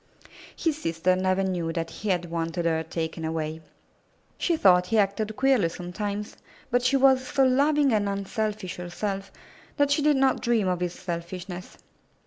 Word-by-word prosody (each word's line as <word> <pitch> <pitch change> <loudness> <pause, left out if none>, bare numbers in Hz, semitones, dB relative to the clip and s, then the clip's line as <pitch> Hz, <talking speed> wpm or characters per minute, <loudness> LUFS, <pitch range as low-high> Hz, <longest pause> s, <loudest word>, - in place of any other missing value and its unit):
His 315 -2 -1
sister 165 +3 +1
never 185 +1 +1
knew 175 -3 -1
that 165 0 -3
he 210 - -5
had 175 -2 0
wanted 165 +1 -2
her 160 -1 +1
taken 160 0 -4
away. 160 0 -3 0.8
She 340 -2 +1
thought 180 -7 +5
he 225 - +1
acted 210 +1 +1
queerly 260 -9 +3
sometimes, 200 +4 -5 0.3
but 245 +1 +3
she 255 +3 +3
was 260 -1 +4
so 270 - +2
loving 280 +1 +3
and 205 -2 +1
unselfish 200 0 -3
herself 195 +2 -4 0.5
that 285 0 +3
she 290 - +3
did 295 -1 +3
not 265 -1 +2
dream 235 -5 +1
of 180 -1 0
his 180 -1 -2
selfishness. 180 +1 -6
195 Hz, 160 wpm, -26 LUFS, 175-245 Hz, 0.8 s, thought